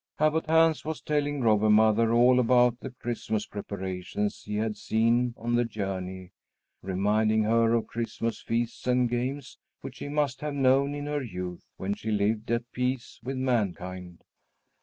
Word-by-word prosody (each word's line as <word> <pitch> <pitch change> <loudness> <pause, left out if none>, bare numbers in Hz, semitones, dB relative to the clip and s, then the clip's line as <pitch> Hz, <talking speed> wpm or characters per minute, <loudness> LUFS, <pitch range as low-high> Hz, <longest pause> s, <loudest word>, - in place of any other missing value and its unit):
Abbot 155 +1 +1
Hans 160 -1 +4
was 160 0 -4
telling 145 -1 -1
Robber 110 -2 +3
Mother 110 +1 +4
all 125 +2 +5
about 125 0 +4
the 135 - -6
Christmas 115 -3 -3
preparations 100 0 -4
he 105 - -5
had 110 0 -1
seen 115 +3 +1
on 120 +1 -3
the 120 0 +3
journey, 95 -4 -5 0.5
reminding 105 +3 +1
her 115 +1 +3
of 115 - 0
Christmas 115 0 -3
feasts 115 +1 -2
and 125 0 +3
games 125 +3 -3 0.2
which - - -8
she - - -6
must 145 -3 -1
have 150 -1 -3
known 135 +1 +3
in 145 0 -5
her 145 0 -2
youth, 90 -7 -6
when 95 +2 -2
she 110 - -6
lived 105 +1 0
at 120 +1 -1
peace 125 0 -3
with 130 +3 -4
mankind. 95 -8 -2
115 Hz, 160 wpm, -27 LUFS, 105-130 Hz, 0.5 s, all